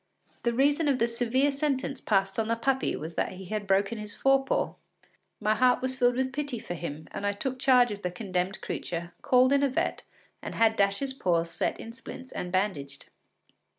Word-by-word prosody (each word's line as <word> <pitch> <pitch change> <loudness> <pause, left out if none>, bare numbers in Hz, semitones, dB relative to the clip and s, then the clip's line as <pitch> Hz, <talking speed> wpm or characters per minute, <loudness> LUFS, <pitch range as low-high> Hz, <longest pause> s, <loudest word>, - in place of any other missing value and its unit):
The 235 - 0
reason 290 +4 +3
of 275 -3 +3
the 235 - +2
severe 245 +4 +1
sentence 275 -1 -1
passed 195 0 +1
on 220 - 0
the 230 - +1
puppy 265 +3 0
was 160 +2 -6
that - - -1
he 190 +1 -9
had 210 +2 -4
broken 195 +3 +1
his 210 -1 -6
fore 270 0 +3
paw. 270 - 0 0.7
My 215 0 +2
heart 250 +3 +4
was 260 0 -1
filled 245 -1 +3
with 260 +1 -1
pity 285 -3 -2
for 195 - -6
him, 160 -3 -6
and - - -6
I 205 0 +1
took 255 +5 -4
charge 250 -3 +5
of 205 -1 -6
the 180 - -1
condemned 185 0 -2
creature; 170 0 -4
called 255 +1 +4
in 280 - +4
a 280 - +3
vet, 260 - -1 0.4
and - - -6
had 225 -1 +4
Dash’s 200 +7 +1
paw 175 -10 +1
set 170 - -2
in 230 - -8
splints 260 +1 -9
and 180 - -5
bandaged. 165 -8 -2
230 Hz, 205 wpm, -28 LUFS, 195-260 Hz, 0.7 s, charge